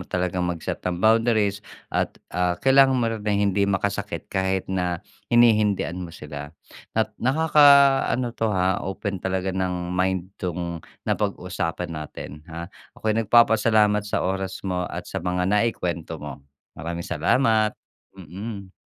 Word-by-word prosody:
talagang 90 0 -1
mag-set 85 -2 -4
ng 90 -1 -2
boundaries 110 -1 +3 0.3
at, - - -1 0.2
ah, 90 -1 +1
kailangan 135 0 +5
mo 120 - +1
na 115 -1 -2
ring 105 -1 +1
hindi 100 +1 +1
makasakit 95 -2 -2
kahit 95 0 0
na 90 -2 -1 0.3
hinihindian 105 -6 +3
mo 90 - -6
sila. 75 -2 -8 0.5
At 110 -1 +1
nakakaano 140 -3 +5
'to 115 -1 0
ha 95 0 +1
open 95 0 -4
talaga 95 0 -1
ng 90 -1 -2
mind 95 +1 -1
'tong 85 -2 -3 0.3
napag-usapan 85 +1 -2
natin, 75 -1 -8
ha. 85 +1 -6 0.3
Ako'y 110 -1 0
nagpapasalamat 110 -2 +4
sa - - 0
oras 95 0 -2
mo 90 -1 -1
at - - -5
sa - - -4
mga 90 0 0
naikuwento 90 -6 -1
mo. 70 -2 -8 0.3
Maraming 85 +2 -5
salamat. 110 -5 +2 0.5
Mm. 95 +3 -8
95 Hz, 135 wpm, -24 LUFS, 90-110 Hz, 0.5 s, kailangan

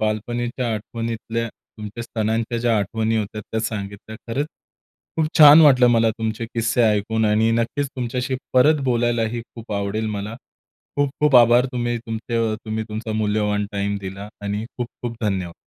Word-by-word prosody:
बालपणीच्या 120 +3 -2
आठवणीतल्या 115 +1 -4
तुमच्या 105 +2 -10
सणांच्या 115 +1 -1
ज्या 115 -1 +2
आठवणी 110 +3 -1
होत्यात 105 0 -3
त्या 110 - 0
सांगितल्या. 105 -1 -5
खरंच 135 +5 -1 0.7
खूप 160 -1 +2
छान 150 0 +10
वाटलं 130 -5 +6
मला 115 -1 +4
तुमचे 110 +1 -3
किस्से 115 +1 +1
ऐकून 110 0 +2
आणि 110 +2 +3
नक्कीच 115 +5 0
तुमच्याशी 125 +1 -2 0.2
परत 145 +4 +5
बोलायलाही 120 -2 0
खूप 115 -2 -8
आवडेल 100 +2 -2
मला. 105 +2 -5 0.6
खूप-खूप 145 -1 +3
आभार. 120 +1 +6
तुम्ही 120 -1 -1
तुमचे 115 0 -3 0.2
तुम्ही 110 0 -3
तुमचा 110 +1 -4
मूल्यवान 105 -1 0
टाईम 100 0 -1
दिला 95 +1 -7
आणि 105 +1 -2
खूप-खूप 120 -1 -5
धन्यवाद! 95 -5 -1
115 Hz, 140 wpm, -22 LUFS, 105-120 Hz, 0.7 s, छान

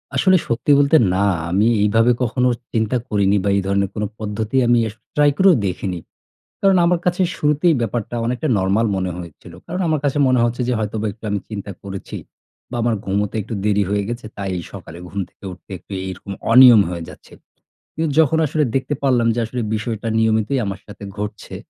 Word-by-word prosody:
আসলে 185 -1 +4
সত্যি 120 +5 0
বলতে 145 +3 +5 0.2
না, 95 +2 +1 0.3
আমি 100 +5 +2 0.2
এইভাবে 115 +3 +3
কখনো 125 +2 +1 0.3
চিন্তা 110 +2 +1
করিনি 100 -1 +2
বা 100 - +1
এই 100 - +1
ধরনের 100 0 +1
কোন 105 - -2 0.2
পদ্ধতি 110 +2 -4
আমি 120 0 +4
আস 105 - -7 0.2
ট্রাই 145 0 +5
করেও 190 -2 +6
দেখিনি। 90 -1 -3 0.6
কারণ 195 -1 +4
আমার 175 0 +2
কাছে 180 +1 +1 0.2
শুরুতেই 150 +3 +2
ব্যাপারটা 115 +1 -3
অনেকটা 125 +6 -1
নরমাল 100 +4 +1
মনে 95 -1 -1
হয়েছিল। 85 0 -11
কারণ 180 +3 -3
আমার 155 -2 +1
কাছে 145 +1 0
মনে 130 -1 +3
হচ্ছে 120 +1 -1
যে 125 - +1
হয়তোবা 110 0 -3
একটু 110 - -29
আমি 100 - 0
চিন্তা 100 -2 -6
করেছি 95 -1 -7 0.5
বা 125 - -6
আমার 120 -2 +1
ঘুমোতে 100 +2 -1
একটু 105 - -7
দেরি 105 -1 +2
হয়ে 100 0 0
গেছে। 120 -1 -5
তাই 100 -1 -3 0.2
সকালে 85 - -10
ঘুম 100 - -5
থেকে - - -16
উঠতে 90 +2 -14
একটু - - -11
এরকম 95 +1 -7 0.2
অনিয়ম 125 -3 +9
হয়ে 85 -2 -5
যাচ্ছে। - - -15 0.6
কিন্তু 160 -1 -1
যখন 160 0 +3
আসলে 150 +1 0
দেখতে 135 +2 0
পারলাম 125 -4 +2
যে - - -4
আসলে, 120 +2 -4
বিষয়টা 110 +1 -3
নিয়মিতই 110 +4 +1
আমার 95 -1 -5
সাথে 105 0 -11
ঘটছে 105 0 -6
110 Hz, 190 wpm, -20 LUFS, 100-130 Hz, 0.6 s, অনিয়ম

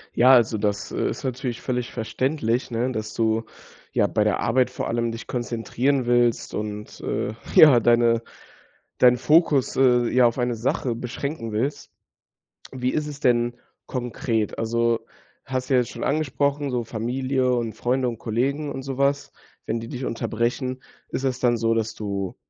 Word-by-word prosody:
Ja, 130 +2 +6
also, 115 -3 +4
das, 105 -1 -1
äh, - - -1
ist - - -6
natürlich 125 -2 -3
völlig 125 -2 -2
verständlich, 125 +1 -1
ne, 120 +2 -1
dass 110 -3 -5
du, 110 0 +1 0.5
ja, - - +3
bei - - +1
der - - +1
Arbeit 125 +2 +2
vor - - -4
allem 115 0 -1
dich 115 0 -7
konzentrieren 125 +2 -1
willst 120 -1 +2
und, 105 0 -5
äh, 105 - -2 0.2
ja, 145 -6 +9
deine 115 0 +3 0.8
deinen 125 -1 +6
Fokus, 150 0 +3
äh, 125 -2 +4
ja, 125 -1 +5
auf 115 - -2
eine 120 -1 0
Sache 120 +1 -1
beschränken 125 +1 -5
willst. 120 +7 -2 0.8
Wie 130 -1 -1
ist 150 -1 -1
es 145 -2 -7
denn 120 -2 +2 0.3
konkret? 120 -3 -2
Also, 115 0 +1 0.5
hast 130 -1 -3
du - - +5
ja - - +6
jetzt 120 - -5
schon - - -6
angesprochen, 145 -1 0
so 120 -1 -1
Familie 130 +3 -1
und 115 -2 -2
Freunde 125 +3 0
und 115 -2 -7
Kollegen 140 +6 -1
und 135 -1 -6
so 135 -1 -5
was, 140 0 +1 0.3
wenn 115 +1 -2
die 115 - -7
dich 130 -2 -5
unterbrechen. 120 +3 -2 0.3
Ist 130 - -3
es 130 -1 -1
dann 120 -1 +2
so, 115 0 +1
dass 110 -1 -1
du 100 -3 -4
120 Hz, 170 wpm, -24 LUFS, 115-130 Hz, 0.8 s, ja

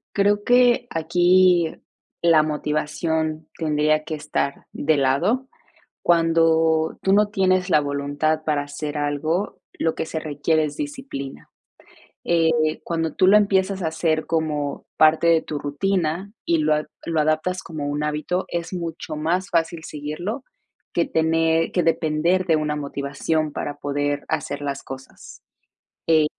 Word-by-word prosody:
Creo 205 +1 +2
que 245 0 +4
aquí 175 +1 +3 0.5
la 165 -2 +5
motivación 155 +1 -2
tendría 155 -1 +1
que 155 - -4
estar 150 -2 -3
de 150 0 +1
lado. 175 - +1 0.5
Cuando 165 -1 +3
tú 190 - +1
no 210 +1 +5
tienes 185 -2 +1
la 150 -4 +4
voluntad 145 +2 -1
para 150 -2 +1
hacer 150 +1 -5
algo, 155 +6 -1
lo 160 - -1
que - - -3
se 160 - -4
requiere 155 +1 0
es 150 - -6
disciplina. 265 - -6 0.7
Eh, 160 -2 +2
cuando 165 -1 -2
tú 185 - +3
lo 205 +2 +8
empiezas 195 -2 +1
a - - 0
hacer 160 0 0
como 150 -3 -2
parte 155 +2 +5
de 165 -1 +4
tu 150 - -4
rutina 175 +4 -1
y 170 - +2
lo 155 0 +2
ad 150 0 0 0.2
lo 165 -2 +1
adaptas 155 +5 0
como 155 -3 -5
un 145 +1 -2
hábito, 150 +5 -2
es 170 +1 -4
mucho 165 -3 -5
más 170 +5 -1
fácil 165 -1 0
seguirlo 155 - -5 0.5
que 170 - +1
tener 165 0 +1
que 180 - +1
depender 165 +3 +1
de 165 - +4
una 150 -1 -1
motivación 145 +2 -2
para 145 - -4
poder 145 0 -2
hacer 155 -2 -3
las 140 -1 -3
cosas, 135 0 -11 0.6
eh. 160 -2 +4
160 Hz, 145 wpm, -22 LUFS, 150-175 Hz, 0.7 s, lo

